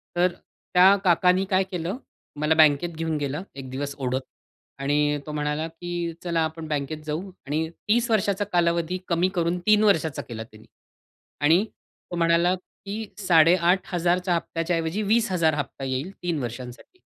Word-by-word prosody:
तर 175 +1 +3
त्या 185 +2 +3
काकांनी 180 +1 +3
काय 190 0 +3
केलं? 180 +5 -3 0.4
मला 150 +1 +3
बँकेत 155 +1 +5
घेऊन 160 -1 -1
गेला 145 +4 -3
एक 135 -2 -8
दिवस 140 +2 -4
ओढत 130 0 -1 0.6
आणि 145 +1 +1
तो 150 - -6
म्हणाला, 150 +1 -2
की 170 0 -4
"चला 170 -2 0
आपण 160 0 -4
बँकेत 150 +1 -3
जाऊ" 160 +6 -4 0.2
आणि 160 +2 -1 0.2
30 235 +2 +3
वर्षाचा 205 -1 +1
कालावधी 170 +1 +1
कमी 175 +2 +2
करून 170 +1 0
3 210 0 +5
वर्षाचा 160 -8 +2
केला 110 -2 -7
त्यांनी 110 -1 -17 0.7
आणि 165 +7 +5 0.5
तो - - -3
म्हणाला, 170 +1 +3 0.3
की 215 +2 -4
8,500च्या 175 0 +3
हप्त्याच्या 165 +1 -2
ऐवजी 165 +6 -2
20हजार 190 -7 +2
हप्ता 140 -2 -4
येईल 135 +8 -3
3 170 -4 -1
वर्षांसाठी. 125 - -8
165 Hz, 145 wpm, -25 LUFS, 150-180 Hz, 0.7 s, बँकेत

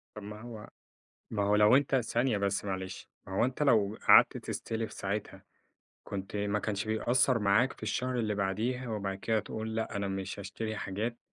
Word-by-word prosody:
طب 105 - -8
ما 105 +1 -8
هو 115 -3 -9 0.6
ما 105 -2 -1
هو 105 +1 +3
لو 105 +4 +6
أنت 135 -1 +2
ثانية 120 -1 +1
بس 100 0 0
معلش، 95 -1 -5 0.2
ما 95 - -6
هو - - +4
أنت 130 +4 -2
لو 110 -6 +3
قعدت - - +8
تستلف 115 0 -4
ساعتها، 100 +1 -4 0.6
كنت 100 0 -5
ما 105 0 0
كانش 105 0 -2
بيأثّر 120 +3 +2
معاك 105 +5 +3
في - - -19
الشهر 125 -1 -1
اللي 105 -2 0
بعديه 110 +6 -1
وبعد 100 -3 -3
كده 110 +1 +1
تقول 110 +1 -5
لأ، 110 -1 -2
أنا 100 -1 -1
مش 95 +1 -4
هاشتري 110 +3 -4
حاجات، 110 +5 -3
105 Hz, 180 wpm, -31 LUFS, 100-115 Hz, 0.6 s, قعدت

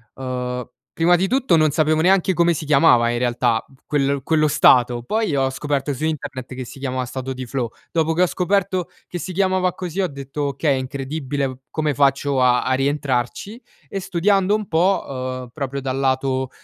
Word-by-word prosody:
Uhm, 125 -1 -4 0.3
prima 175 +2 +4
di 190 +2 0
tutto 260 -8 +2
non 155 -2 +3
sapevo 155 +1 +2
neanche 190 +1 +3
come 170 0 +3
si 155 - -5
chiamava 135 -5 +5
in 120 - -1
realtà 120 -2 +1
p - - -24
quel 140 -1 0
quello 155 +1 +2
stato, 125 -4 +4
poi 215 - -1
ho 135 -1 +2
scoperto 145 +1 -2
su 140 +4 -6
internet 135 -5 -4
che 130 -1 -5
si - - -11
chiama 130 -1 -2
stato 130 +1 -5
di 130 0 -6
flow, 125 -1 -3 0.2
dopo 160 -1 +1
che 175 +3 +3
ho - - +3
scoperto 185 0 0 0.2
che 180 - -5
si 185 +2 -5
chiamava 185 -1 +1
così 180 +1 -4
ho 185 - +1
detto: 140 0 -6
"Okay 140 +2 0
è - - -1
incredibile 140 +1 -3
v 130 -1 -8
come 155 -2 -1
faccio 140 0 +2
a 125 -1 +4
a 130 - 0
rientrarci?" 140 - -1 0.3
E 195 - -3
studiando 195 +2 +2
un 215 -2 -3
po', 175 +4 +2
uhm, 130 -2 -5
proprio 140 -2 -4
dal 130 0 -3
lato, 130 -1 0
140 Hz, 195 wpm, -21 LUFS, 130-170 Hz, 0.3 s, chiamava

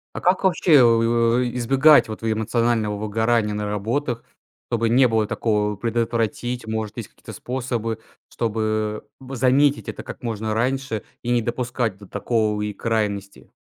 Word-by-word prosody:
А - - -5
как 185 +2 +2
вообще, 175 -3 +3
э, 140 - +8
у 115 0 +3
эй, 125 -1 -1
избегать 135 +5 +5
вот 110 - -6
в 115 -1 0
эмоционального 110 -1 0
выгорания 110 +1 0
на 105 0 -3
работах, 115 +5 -2 0.4
чтобы 115 -1 0
не 125 +2 +5
было 110 -2 +1
такого? 105 -2 0
Предотвратить, 115 +2 -2
может, 110 0 -4
есть 115 - -6
какие-то - - -12
способы, 120 -3 -3 0.3
чтобы 110 -2 -2
в 135 0 -8
заметить 135 +3 +3
это - - -5
как - - -9
можно 110 -2 -2
раньше 125 -1 -1 0.2
и 120 - -5
не 120 -1 +3
допускать 120 -3 -2
до 100 - -14
такой 105 +1 -1
и 105 - -6
крайности? 100 -2 -3
115 Hz, 160 wpm, -22 LUFS, 110-125 Hz, 0.4 s, э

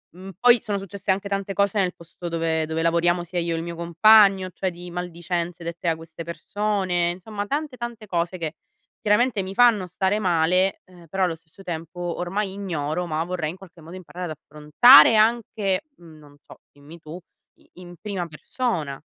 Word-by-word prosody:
mhmm, 190 +1 -10
poi 245 -1 +6
sono 200 -1 -3
successe 195 0 -3
anche 200 +1 -2
tante 195 0 -2
cose 200 +1 +1
nel 185 -3 +1
posto 170 +1 -10
dove 165 -1 -1
dove 160 +1 -3
lavoriamo 170 +1 +2
sia 175 +1 -7
io 170 -1 0
e - - -2
il 165 - -4
mio 170 0 -6
compagno, 190 +3 +5
cioè 185 +1 -3
di 175 +1 -10
maldicenze 175 0 -4
dette 170 0 -3
da 165 - +1
queste 165 0 -10
persone. 185 0 -1
Insomma, 205 +3 -6
tante, 285 +2 -3
tante 235 -3 -7
cose 175 0 -2
che 160 -1 -4 0.4
chiaramente 210 -1 +2
mi 190 +1 -6
fanno 225 -5 +4
stare 190 +3 -1
male, 180 0 +1
eh, 180 -2 -17
però 190 +4 0
allo 165 -2 -2
stesso 165 +3 -19
tempo 170 -1 -7
ormai 175 +3 -3
ignoro, 175 -4 -3
ma 160 -1 -2
vorrei 170 -3 -3
in 185 - -12
qualche 180 -2 -16
modo 165 +4 -11
imparare 180 0 -8
ad - - -6
affrontare 150 - +6
anche 215 -3 +1 0.2
non 155 -4 -16
so, - - -15
dimmi 145 +4 -14
tu, 160 +2 -9 0.4
i - - -27
in 175 -1 -12
prima 200 -4 -3
persona. 155 - -3
180 Hz, 185 wpm, -23 LUFS, 165-200 Hz, 0.4 s, poi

